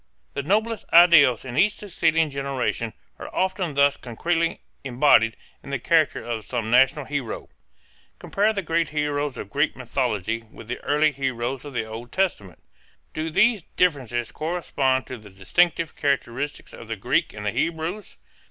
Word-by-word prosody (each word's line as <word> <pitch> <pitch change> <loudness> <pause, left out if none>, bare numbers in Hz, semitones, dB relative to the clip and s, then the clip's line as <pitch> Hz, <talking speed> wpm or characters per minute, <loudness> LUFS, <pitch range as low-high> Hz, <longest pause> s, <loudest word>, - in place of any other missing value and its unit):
The - - -2
noblest 215 +8 0
ideals 160 -9 +7
in 125 -2 -6
each 205 +5 +4
succeeding 165 -5 0
generation 135 -5 -2 0.3
are - - -7
often 185 -4 -1
thus 140 0 +4
concretely 165 +8 -1 0.2
embodied 120 -4 +4 0.3
in - - -12
the 140 - -1
character 155 +3 +2
of 115 -2 -4
some 115 -2 -3
national 135 +4 +4
hero. 140 -6 -4 0.7
Compare 205 +2 +1
the 200 -2 -3
great 165 0 0
heroes 145 -2 -2
of - - -7
Greek - - +1
mythology 110 +3 -2
with 110 - -12
the 125 - -3
early 150 +1 +2
heroes 130 -1 -3
of 145 - -8
the 115 -2 -2
Old 115 +2 -8
Testament. 140 - -2 0.5
Do 155 +1 -3
these 215 +5 +3
differences 130 -9 0
correspond 145 -5 -1
to 130 - -8
the 105 -1 -13
distinctive 155 - +1
characteristics 140 0 -2
of - - -11
the - - -3
Greeks - - 0
and 105 0 -7
the 105 - +1
Hebrews? 165 - -3
145 Hz, 155 wpm, -24 LUFS, 120-165 Hz, 0.7 s, ideals